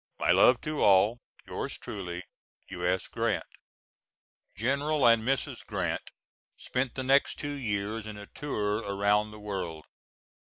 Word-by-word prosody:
My - - +2
love 125 - +6
to 155 -1 -3
all. 100 +4 +5 0.3
Yours - - -4
truly, 90 -3 -6 0.5
U.S. 90 0 0
GRANT. - - -1 1.1
[General 140 - +1
and 115 -1 +6
Mrs. 130 +2 -1
Grant - - -3 0.5
spent 125 -1 -2
the 130 - -2
next 135 +2 +3
two 145 -1 -3
years 110 -4 -2
in 105 -1 -7
a 105 - -8
tour 105 -6 -2
around 105 0 +1
the 105 - -11
world. 90 -7 -5
105 Hz, 130 wpm, -29 LUFS, 100-130 Hz, 1.1 s, love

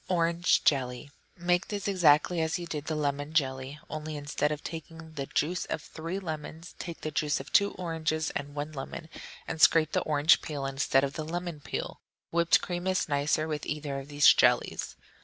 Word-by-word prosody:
Orange 170 -1 +2
Jelly 130 0 +1 0.3
Make 175 +1 +1
this 205 -2 -3
exactly 175 -2 +4
as 160 +3 0
you 175 - -6
did 150 -3 -5
the 155 - -2
lemon 145 0 -2
jelly, 135 -2 0
only 155 0 -5
instead 145 +1 -1
of 150 -1 -4
taking 160 0 -8
the 140 -3 -4
juice 175 +4 0
of - - -3
three 165 +4 -6
lemons, 160 -2 -6
take 170 -2 -6
the 155 - -3
juice 150 -2 0
of 135 - -9
two 200 0 +4
oranges 160 -3 -2
and 145 +1 -5
one 150 +1 -3
lemon, 155 +3 -7 0.4
and 160 - -4
scrape 155 -1 +6
the - - +1
orange 150 +2 +4
peel 145 -3 -4
instead 135 0 +2
of 140 0 -1
the 155 - -4
lemon 170 0 -4
peel. - - -5 0.3
Whipped 170 0 +4
cream 175 0 -3
is 185 0 +1
nicer 150 +1 +1
with 150 -2 -3
either 150 -2 -3
of 135 - -9
these 145 0 +1
jellies. - - +2
155 Hz, 190 wpm, -29 LUFS, 145-170 Hz, 0.4 s, scrape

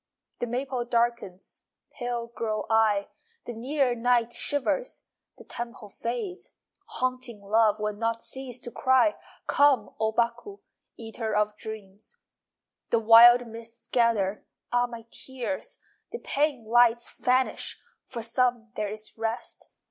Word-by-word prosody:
The 240 - -2
maple 255 +1 -2
darkens 235 -5 -2 0.3
(Pale 240 -3 -4
grow 220 -2 -2
I!) 215 -2 +3 0.4
The 240 - -5
near 260 +2 0
night 240 0 +1
shivers 290 - -1 0.3
(The - - -12
temple 235 -3 -7
fades.) 245 - -5 0.3
Haunting 255 -3 -2
love 215 +1 +3
Will 210 0 -1
not 230 +2 -2
cease 260 -2 -4
to 240 - -6
cry! 260 +6 +3 0.3
Come, 280 -7 +3
O 220 0 +1
Baku, 235 - -1 0.4
Eater 225 -1 -4
of 210 0 +1
dreams! 215 - -9 0.7
The 235 - +3
wild 235 +2 +8
mists 230 0 -10
gather 215 -5 +1 0.3
(Ah, 245 0 +2
my 235 -1 -9
tears!) 265 +1 -5 0.3
The 470 - -4
pane 285 - -1
lights 235 +1 +3
vanish 255 +1 +1 0.2
(For 235 -3 -6
some 235 -1 0
there 210 -1 -2
is 215 +1 -8
rest.) 225 +1 -3
235 Hz, 125 wpm, -27 LUFS, 220-250 Hz, 0.7 s, wild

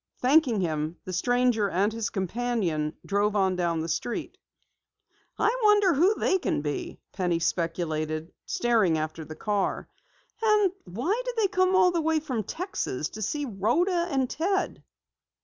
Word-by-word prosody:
Thanking 255 -5 +3
him, 155 -1 -2
the 185 - -5
stranger 245 +1 +2
and 200 +4 +1
his 225 -2 -2
companion 190 -6 -1
drove 205 +1 +1
on 190 -2 +2
down 170 -2 0
the 160 - -3
street. 170 +9 -3 1.0
"I 440 +3 +2
wonder 415 -4 +5
who 360 +9 +4
they 380 - +1
can 145 - -1
be?" 145 -1 -4
Penny 180 -3 0
speculated, 165 -1 -2
staring 220 -9 +2
after 155 +1 -4
the 155 +1 -9
car. 205 +1 -1 0.5
"And 425 -4 +4
why 260 - -1
did - - -4
they 435 -3 +3
come 370 0 +2
all 360 -1 +5
the 340 -1 0
way 320 0 +2
from 260 -7 -3
Texas 320 - -3
to 215 - -9
see 290 +8 -2
Rhoda 325 - +1
and 270 -4 +1
Ted?" 380 +8 -1
220 Hz, 150 wpm, -27 LUFS, -, 1.0 s, wonder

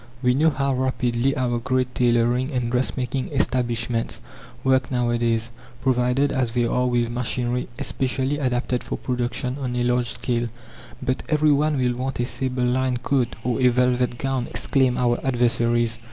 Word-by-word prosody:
We 125 0 +4
know 155 +5 +4
how 140 -2 0
rapidly 130 0 0
our 120 -2 0
great 130 +1 -1
tailoring 120 +2 +2
and 125 -3 -1
dressmaking 125 +1 -1
establishments 120 -4 0 0.4
work 130 -2 +2
nowadays, 120 -2 0 0.3
provided 130 +2 +2
as 130 -3 0
they 120 +1 0
are 125 +2 +1
with 120 -1 +1
machinery 125 0 -2
specially 135 +2 -1
adapted 125 -2 -1
for - - -4
production 125 +1 -2
on 125 -3 -3
a 120 - 0
large 120 -1 +1
scale. 120 -2 -2 0.5
"But 130 +1 -1
every 155 -1 +3
one 150 +1 +2
will 125 -1 +1
want 130 +2 -4
a 120 - +1
sable 130 0 -2
lined 125 0 0
coat 130 -4 0
or 125 +1 -1
a 125 - +6
velvet 125 0 +2
gown!" 135 -1 -1
exclaim 130 -3 +1
our 120 -1 +2
adversaries. 120 -2 +1
125 Hz, 155 wpm, -23 LUFS, 120-130 Hz, 0.5 s, a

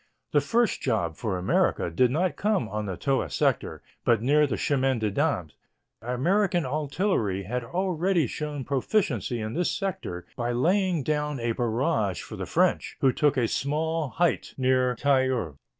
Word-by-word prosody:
The 145 - +4
first 225 +11 +1
job 100 - 0
for 105 -2 -2
America 90 -1 +1
did 125 +9 +3
not 160 +4 0
come 205 - 0
on 105 -1 -4
the 95 -3 -4
Toul 135 -2 0
sector, - - 0 0.2
but 115 -2 +3
near 145 +6 +3
the - - -2
Chemin 135 -3 +1
des 110 -2 -1
Dames. 140 - -1 0.5
American 170 - +1
artillery 140 - -1
had 125 +6 -3
already 180 +2 0
shown 145 +2 -4
proficiency 130 - 0
in 110 0 -4
this 175 +2 0
sector 130 - -4
by 120 0 -2
laying 180 +4 +1
down 150 -1 -1
a 115 0 0
barrage 115 - 0
for - - -8
the - - -5
French, - - +1
who 130 -2 +4
took 145 0 +2
a 120 -3 +2
small 155 +4 -1
height 175 +5 0
near 130 -1 +2
Tahure. 130 - +1
135 Hz, 160 wpm, -26 LUFS, 115-160 Hz, 0.5 s, The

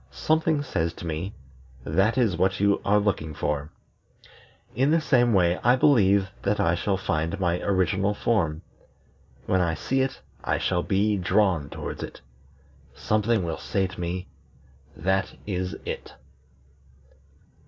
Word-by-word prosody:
Something 155 -1 +1
says 85 - -1
to 85 - -9
me: 85 +5 -4 0.5
'That 95 - +1
is 115 -8 +2
what 95 +3 +1
you 100 0 +2
are 105 +1 +3
looking 95 -7 -1
for.' 75 -1 -2 1.0
In 135 +5 +2
the 165 +2 +4
same 125 -6 +3
way 90 -3 +3
I 120 +2 +5
believe 100 -8 +4
that 105 +1 0
I 85 - +3
shall 95 +3 0
find 80 -2 -2
my 90 -1 +1
original 100 +1 +1
form. 85 -10 0 0.8
When 95 - +2
I 85 -2 0
see 135 - 0
it, 135 0 -2 0.2
I - - 0
shall 90 -1 0
be 100 +3 +1
drawn 90 -4 +1
towards - - -6
it. - - -7 0.8
Something 110 -1 +1
will 80 -2 -3
say 95 -2 0
to 95 0 -8
me: 90 +2 -3 0.7
'That 95 +4 0
is 90 -2 -3
it.'" - - -6
95 Hz, 145 wpm, -25 LUFS, 85-105 Hz, 1.0 s, I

